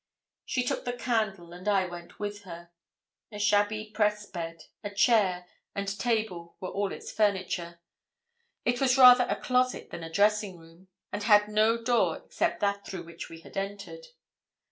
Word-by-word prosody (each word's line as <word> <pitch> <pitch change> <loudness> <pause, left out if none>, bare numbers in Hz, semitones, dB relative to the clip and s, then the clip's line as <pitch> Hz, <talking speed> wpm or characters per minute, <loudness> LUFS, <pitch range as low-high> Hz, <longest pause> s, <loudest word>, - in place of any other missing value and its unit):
She 250 - 0
took 245 - -2
the 245 - -3
candle, 215 -8 -2
and 180 +3 -10
I 195 -2 +3
went 175 -1 -8
in - - -24
with 205 0 -5
her. 170 -2 -11 0.6
A 210 - -7
shabby 205 +1 +1
press 210 -1 +1
bed, 165 -4 -7 0.2
a 205 - -3
chair, 200 -4 +2 0.3
and 200 0 -3
table 215 -8 -2
were 185 - -5
all 200 0 -2
its - - -7
furniture; 185 -4 -1 0.9
it 245 +1 +1
was 260 -1 +3
rather 250 -1 +8
a - - -1
closet 255 0 0
than - - -6
a 165 - -6
dressing 205 0 +2
room, 165 +3 -18 0.2
and 205 - -3
had 210 -1 +5
no 215 +2 +3
door 235 +1 +1
except - - -1
that 200 0 0
through 185 -2 -6
which 170 0 -9
we 165 0 -11
had - - -15
entered. 200 - -5
205 Hz, 170 wpm, -28 LUFS, 180-220 Hz, 0.9 s, rather